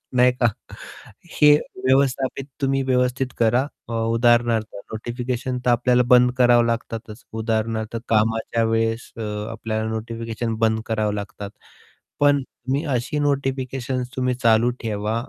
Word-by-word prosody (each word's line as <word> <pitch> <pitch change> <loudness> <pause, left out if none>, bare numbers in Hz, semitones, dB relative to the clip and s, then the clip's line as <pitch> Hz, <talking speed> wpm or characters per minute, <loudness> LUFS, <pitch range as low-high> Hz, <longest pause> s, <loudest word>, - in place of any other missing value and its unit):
नाही 125 0 +5
का. - - +5 0.9
हे 150 -1 +5 0.3
व्यवस्थापित 135 0 +1 0.2
तुम्ही 135 -1 +1
व्यवस्थित 125 0 +1
करा 120 +2 +3 0.3
अ, - - -6 0.2
उदाहरणार्थ 115 -1 +3 0.3
नोटिफिकेशन 125 +2 -3
तर - - +5
आपल्याला 125 +1 +3
बंद 125 0 +6
करावं 120 -1 +5
लागतातच. 115 -1 -4
उदाहरणार्थ 110 0 -2
कामाच्या 110 +1 +1
वेळेस 115 +1 0
अ, - - -7 0.3
आपल्याला 110 -1 -3
नोटिफिकेशन 115 0 -4
बंद 110 -1 +2
करावं 110 -2 0
लागतात. 100 0 -6 0.7
पण 145 -1 +4
तुम्ही 130 +3 -4
अशी 125 +5 -2
नोटिफिकेशन्स 135 -3 -1
तुम्ही 125 -1 0
चालू 115 -1 +3
ठेवा 105 -1 -2
120 Hz, 120 wpm, -22 LUFS, 110-130 Hz, 0.9 s, बंद